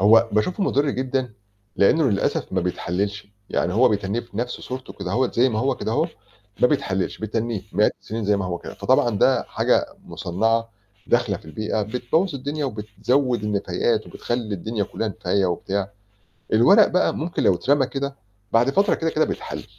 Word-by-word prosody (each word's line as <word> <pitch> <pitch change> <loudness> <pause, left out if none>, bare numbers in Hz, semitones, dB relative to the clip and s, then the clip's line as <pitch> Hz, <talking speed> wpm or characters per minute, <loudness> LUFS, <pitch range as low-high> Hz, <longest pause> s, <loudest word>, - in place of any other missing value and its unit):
هو 115 +3 +6
باشوفه 180 - +1
مضرّ 145 -5 +2
جدًا؛ 130 0 -1 0.5
لإنه 155 +11 +4
للأسف 100 - -1
ما 95 - +1
بيتحللش. 100 +3 -2 0.2
يعني 90 - 0
هو 125 +3 +5
بيتنّيه 105 +2 -1
في 120 -4 -14
نَفْس 125 +2 -3
صورته 130 0 -7
كده - - -5
هوّة 130 +1 +1
زَي 125 +3 +4
ما 110 -3 -2
هو 135 +2 +1
كده - - -3
هو - - +1 0.5
ما - - +7
بيتحللش، 95 -9 -1
بيتنّيه 110 -1 -2
مئات 105 +4 +3
السنين 110 0 -4
زَي 105 0 +3
ما 100 - -2
هو 90 -1 -3
كده، - - -9
فطبعًا - - +2
ده - - +4
حاجة - - +1 0.2
مُصنعة 115 +6 0 0.4
داخلة 120 -4 +2
في - - -16
البيئة 105 +6 -2
بتبوّظ 125 - 0
الدنيا، 145 +3 -3
وبتزود 115 +2 0
النفايات، 105 +2 0
وبتخلّي 120 -3 -3
الدنيا 105 +3 -2
كلّها 110 - -3
نفاية 95 -1 0
وبتاع. 95 +2 -2 0.6
الورق 195 - +7
بقى 180 - +2
ممكن 170 +3 -2
لو 95 - +5
اترمى 135 +9 +2
كده 140 +1 -4 0.4
بعد 120 +4 +4
فترة 200 +7 +3
كده، 165 - -1
كده 155 0 +2
بيتحلل، - - -5
115 Hz, 175 wpm, -23 LUFS, 100-130 Hz, 0.6 s, ما